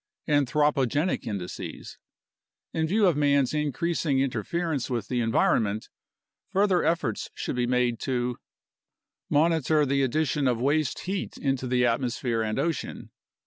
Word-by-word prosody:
Anthropogenic 145 +1 +1
Indices 100 -5 -6 0.7
In 160 0 0
view 205 +5 +3
of 175 -5 +4
man's 140 -2 +2
increasing 150 -1 0
interference 140 +4 -1
with 120 -4 -3
the 125 -1 0
environment, 110 -2 +1 0.6
further 195 -2 +2
efforts 150 -9 -1
should - - -3
be 120 -1 0
made 125 -2 +1
to 125 -2 -2 0.9
Monitor 155 -1 +3
the 140 0 +1
addition 145 +1 +1
of 120 -2 +1
waste 145 +2 +1
heat 190 +1 -4
into 135 -2 -1
the 125 0 +2
atmosphere 120 -1 0
and 110 -1 -2
ocean. 165 -1 -3
135 Hz, 125 wpm, -27 LUFS, 120-155 Hz, 0.9 s, of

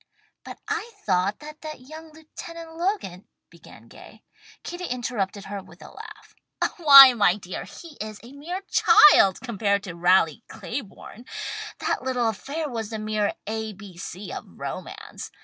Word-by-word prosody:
"But - - -9
I 460 +2 -3
thought 190 +1 +1
that 305 +1 -11
that 310 -4 -8
young 315 +4 -12
Lieutenant 325 +1 -11
Logan," 335 - -3 0.2
began - - -16
Gay. - - -15 0.4
Kitty 355 +1 -6
interrupted 235 - -3
her 200 0 -6
with 180 -1 -16
a - - -12
laugh. - - -12 0.4
"Why 275 -6 +10
my 205 -6 +3
dear, 185 -3 -7
he 330 -4 -13
is 215 -1 -6
a 240 - -12
mere 340 +7 -6
child 295 - +6
compared 205 -4 -1
to 185 -4 -7
Raleigh 175 +3 +2
Claiborne. 235 -1 -8 0.5
That - - -2
little 250 -3 0
affair 285 +9 -4
was 225 -5 -5
the 220 - -5
mere 215 -1 -1
A. 220 0 -4
B. 195 -2 -13
C. 185 +2 -8
of - - -6
romance. - - -8
230 Hz, 150 wpm, -24 LUFS, 200-305 Hz, 0.5 s, Why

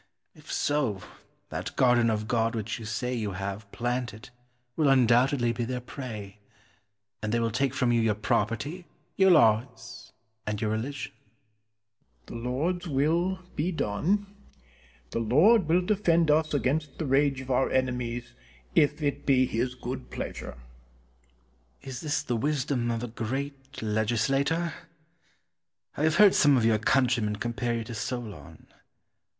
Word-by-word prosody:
If - - -12
so, 135 -10 0 0.5
that - - -5
garden 120 -2 +4
of 110 -1 -1
God 115 0 +1
which 110 0 -3
you 115 - -8
say 125 +4 -2
you 110 -5 -2
have 100 +2 -5
planted 120 0 -3 0.4
will 155 - +2
undoubtedly 125 -1 +4
be 120 - -2
their 125 +1 -3
prey, 110 -6 -8 0.8
and 110 0 -2
they 120 - +2
will 115 -1 0
take 135 +3 0
from 125 -3 +2
you 120 -1 +3
your 110 -2 +2
property, 115 - -1 0.3
your 190 0 +5
laws, 120 -6 +2 0.4
and 105 -1 -2
your 110 -1 -1
religion. 125 +6 -3 1.1
Penn. 115 - -7
The 125 - -3
Lord's 175 +8 -1
will 170 +6 +1
be 165 +5 0
done. 170 - 0 0.9
The - - -1
Lord 155 - +4
will 170 +3 +3
defend 170 -6 +3
us 155 +1 +2
against 145 +1 -1
the 160 - -3
rage 135 0 +2
of 130 0 -6
our 130 +1 +2
enemies 120 -2 -2 0.4
if 150 +1 +2
it 145 0 -1
be 130 -2 +4
His 125 +1 -2
good 125 +1 -6
pleasure. - - -6
Cortez. 65 -1 -17 1.3
Is - - -7
this 150 -2 -1
the 120 - -2
wisdom 135 -1 0
of 115 0 -2
a - - -2
great 135 +4 -5
legislator? 135 +10 0 1.2
I - - -4
have 160 -1 +2
heard 205 +1 +7
some 145 -2 +5
of 115 - +2
your 110 -1 +3
countrymen 120 -2 +2
compare 120 +2 -2
you 115 - -2
to 115 - -8
Solon. 110 - -6
125 Hz, 150 wpm, -27 LUFS, 115-145 Hz, 1.3 s, heard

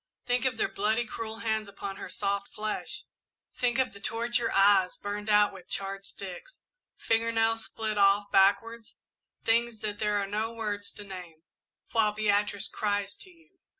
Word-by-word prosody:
"Think 250 +1 +1
of 255 -3 +1
their - - +2
bloody, 220 +4 0
cruel 225 0 -6
hands 220 -2 0
upon 200 -1 -6
her - - -7
soft 200 0 -1
flesh 215 0 -4 0.5
think 245 -1 +1
of 255 -4 +1
the 200 - -11
torture 230 +3 0
eyes 195 -2 +5
burned 205 +1 -4
out 210 -1 +5
with 185 -2 -12
charred 195 0 -3
sticks 195 - -9 0.4
finger 230 0 +1
nails 225 0 +1
split 215 -2 -3
off 200 +1 +4
backward 225 +4 +3 0.6
things 235 0 +2
that 210 -1 -3
there 210 -1 +1
are 200 - 0
no 215 +3 -2
words 210 -3 -4
to 205 - -9
name, 180 -5 -9 0.5
while 220 -2 +3
Beatrice 205 -1 +1
cries 205 -1 -1
to 380 - -12
you! 350 +2 -23
210 Hz, 165 wpm, -29 LUFS, 200-225 Hz, 0.6 s, eyes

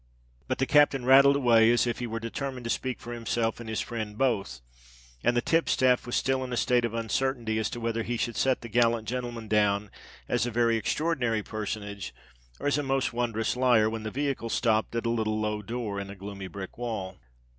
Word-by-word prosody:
But 130 - -1
the 135 - +1
captain 140 -2 +4
rattled 140 +2 +7
away 115 -4 +5
as 120 +1 +3
if 120 0 -2
he 120 - -3
were 115 0 -4
determined 125 +2 -5
to 115 - -2
speak 130 -1 -2
for 120 - -7
himself 115 -1 -1
and 115 -2 -7
his 110 - -1
friend 110 -3 -5
both; 110 - 0 0.6
and 120 - +2
the 120 - +1
tipstaff 130 -7 +2
was 120 - -2
still 130 0 +1
in 125 - -6
a 120 - -2
state 120 0 +2
of 115 -1 -4
uncertainty 115 -1 -1
as 110 - -1
to 120 - -6
whether 115 0 -1
he 120 +1 -2
should 120 0 -2
set 130 +3 +1
the 115 - -7
gallant 115 -1 +2
gentleman 120 -2 -4
down 105 -1 +1 0.4
as 120 - +1
a - - -1
very 115 0 +2
extraordinary 120 -2 0
personage, 105 -2 -5 0.4
or - - -7
as 145 +1 +2
a - - +1
most 135 -2 0
wondrous 115 -2 -1
liar, 120 -4 +4
when 110 0 -4
the 110 - -4
vehicle 135 -3 -2
stopped 110 -1 +1
at 115 - -1
a - - +1
little 110 -2 0
low 105 0 -1
door 105 -1 -4
in 100 0 -6
a 100 - -8
gloomy 100 0 -7
brick 95 +3 -8
wall. 100 -6 -4
115 Hz, 215 wpm, -28 LUFS, 110-125 Hz, 0.6 s, rattled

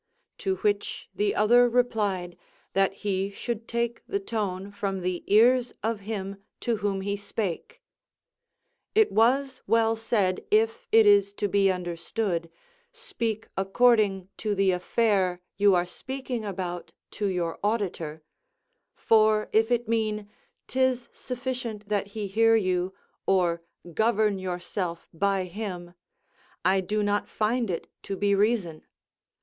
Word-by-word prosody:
To 190 -1 0
which 205 +2 -1
the 205 +2 0
other 240 +3 +5
replied, 210 -8 0 0.4
"That 195 0 +3
he 195 -1 0
should 230 +2 -5
take 235 0 -2
the 400 - -1
tone 200 - -3
from 195 -2 -3
the 180 0 -2
ears 245 +4 +4
of 225 -1 -1
him 200 -1 -5 0.2
to 235 -3 0
whom 200 -2 -1
he 200 +1 -1
spake." 205 - -4 1.1
It 440 0 +5
was 255 +5 +2
well 225 0 +3
said, 215 -5 0
if 225 +1 +2
it 225 -1 +7
is 200 -1 +5
to 205 - -1
be 195 0 +3
understood: 175 0 -3 0.4
"Speak 230 - -4
according 195 -2 +3
to 210 -2 -1
the 195 -1 +3
affair 185 -1 +1 0.2
you 200 -1 +5
are 175 0 +2
speaking 260 +4 -5
about 180 -3 -5 0.2
to 205 - -2
your 175 -3 -2
auditor," 175 -8 -2 0.7
for 215 -1 +3
if 225 +1 +4
it 240 -1 +1
mean, 215 -2 -1 0.4
"'tis 260 -1 0
sufficient 245 -4 -5
that 205 -1 0
he 210 - -2
hear 225 +3 +4
you, 185 -3 +1 0.4
or 175 -3 +2 0.3
govern 215 0 +2
yourself 180 -1 -4
by 195 +2 +1
him," 180 -2 -6 0.7
I 190 +1 +4
do 210 +3 -1
not 205 0 0
find 225 +1 0
it 170 - -3
to 195 - -5
be 200 0 +2
reason. 200 -6 0
205 Hz, 135 wpm, -27 LUFS, 190-225 Hz, 1.1 s, it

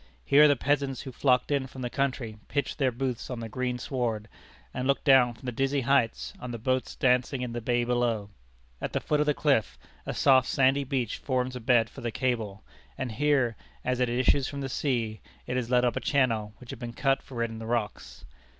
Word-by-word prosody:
Here 150 +2 +7
the 145 - +4
peasants 140 -1 0
who 135 - -7
flocked 125 +2 +2
in 140 -2 +1
from 130 0 -8
the 120 - -2
country 130 -6 -2
pitched 145 +1 -2
their 135 -2 +2
booths 125 0 -3
on 125 -2 -4
the 115 - -5
green 125 +2 -2
sward, 120 -4 -2 0.5
and 125 +1 -2
looked 140 - +1
down 130 -4 +5
from 120 - -15
the 125 - -2
dizzy 135 +3 0
heights 125 -2 +1
on 125 - -6
the 120 - -4
boats 130 +2 -1
dancing 125 +1 +1
in 120 -2 -4
the 120 - -3
bay 120 +1 +1
below. 120 -4 0 0.5
At - - -4
the - - +1
foot 150 - 0
of 150 - +1
the 150 - +2
cliff, 140 -8 +1 0.3
a - - -3
soft, 130 -2 +5
sandy 135 +1 +3
beach 130 -4 -2
forms 130 -1 -1
a - - -4
bed 120 -1 +3
for 135 - -11
the 120 - -2
cable, 115 -5 -2 0.3
and 130 -3 -3
here, 135 -1 +2 0.3
as 125 0 0
it 125 -1 +2
issues 130 +3 +2
from 140 0 -5
the 135 - -3
sea, 115 -6 -1 0.2
it 125 - -3
is 125 -2 -1
led 125 0 +4
up 120 - +1
a - - 0
channel 115 -7 +1
which 125 - -10
had 135 - -8
been 120 -1 -6
cut 135 +1 +1
for 120 -3 -4
it 115 - -2
in 110 - -7
the 110 - -7
rocks. 115 -3 -3
125 Hz, 225 wpm, -28 LUFS, 120-135 Hz, 0.5 s, Here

